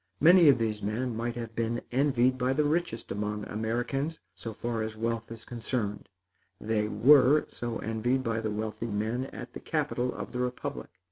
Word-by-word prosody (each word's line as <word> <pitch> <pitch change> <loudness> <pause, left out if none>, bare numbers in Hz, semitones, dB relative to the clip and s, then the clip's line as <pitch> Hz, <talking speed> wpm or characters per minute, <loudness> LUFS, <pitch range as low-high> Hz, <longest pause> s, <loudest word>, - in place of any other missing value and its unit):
Many 170 0 +8
of 135 - +6
these 110 -2 -1
men 115 +4 -2
might 115 +1 -2
have 115 -2 -6
been 115 +1 -1
envied 130 -1 +3
by 130 +1 +1
the 150 +3 +2
richest 150 -6 -1
among 105 +1 -2
Americans, 120 +8 -2
so 115 - -7
far 115 +1 -3
as 110 0 -4
wealth 115 0 -2
is 115 0 -8
considered. 115 -3 -3 0.5
They 105 -1 0
were 140 +5 +6
so 120 -1 -4
envied 120 +4 0
by 115 -2 -1
the 110 - -1
wealthy 110 +1 -3
men 110 +5 -1
at - - -9
the - - -6
capital 125 +1 -1
of - - -6
the 125 - -4
republic. 125 0 -3
115 Hz, 180 wpm, -29 LUFS, 110-130 Hz, 0.5 s, Many